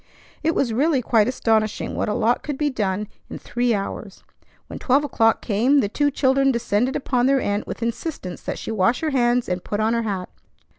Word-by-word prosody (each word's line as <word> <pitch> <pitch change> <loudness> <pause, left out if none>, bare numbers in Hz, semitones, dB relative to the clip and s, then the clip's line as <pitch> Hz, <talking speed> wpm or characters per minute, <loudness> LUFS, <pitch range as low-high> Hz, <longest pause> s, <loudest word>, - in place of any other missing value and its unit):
It 325 +1 0
was 240 -5 +1
really 275 +1 +2
quite 220 -2 +3
astonishing 220 -4 0
what - - -1
a - - -1
lot 240 0 +1
could 290 -3 -4
be 295 0 0
done 210 -3 -2 0.2
in - - -6
three 245 0 -1
hours. 200 0 -6 0.4
When - - -8
twelve 275 +3 +2
o'clock 225 -5 +2
came, 240 +7 +3
the 205 - 0
two 290 +6 +1
children 270 0 +2
descended 235 +1 0
upon 250 -2 +1
their 275 0 +3
aunt 205 -3 -2
with - - -5
insistence 230 - -4
that - - -4
she - - -5
wash 220 +3 +1
her 315 -1 -1
hands 245 -2 +2
and 180 0 -3
put 205 - -3
on 220 +1 +2
her 235 - +1
hat. 195 -5 -3
240 Hz, 205 wpm, -22 LUFS, 215-270 Hz, 0.4 s, quite